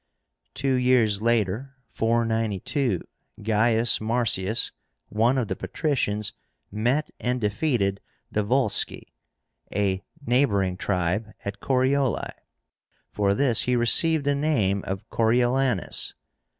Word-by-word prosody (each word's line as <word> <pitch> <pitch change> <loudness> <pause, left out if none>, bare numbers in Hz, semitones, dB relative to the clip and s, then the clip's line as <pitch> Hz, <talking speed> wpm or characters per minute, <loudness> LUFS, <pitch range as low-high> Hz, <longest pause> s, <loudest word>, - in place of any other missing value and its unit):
Two 135 0 0
years 125 -5 +2
later 115 +3 0
(492) 115 - 0 0.4
Gaius 110 +2 +3
Marcius, 110 -2 0 0.4
one 115 +5 +2
of 125 -4 0
the 95 - -3
patricians, 105 - -1 0.4
met 120 +8 0
and 125 +1 -1
defeated 105 -3 0 0.3
the 105 - 0
Volsci, 125 +1 0 0.6
a 100 -1 0 0.2
neighboring 100 -8 +2
tribe, 95 +3 -1
at 100 0 -5
CORIOLI. 130 0 +1 0.8
For 100 -1 +1
this 125 -2 +3
he 125 - +1
received 140 +6 +4
the 145 - +2
name 115 -10 0
of 95 +3 -5
CORIOLÁNUS. 120 -1 +1
115 Hz, 100 wpm, -25 LUFS, 100-130 Hz, 0.8 s, received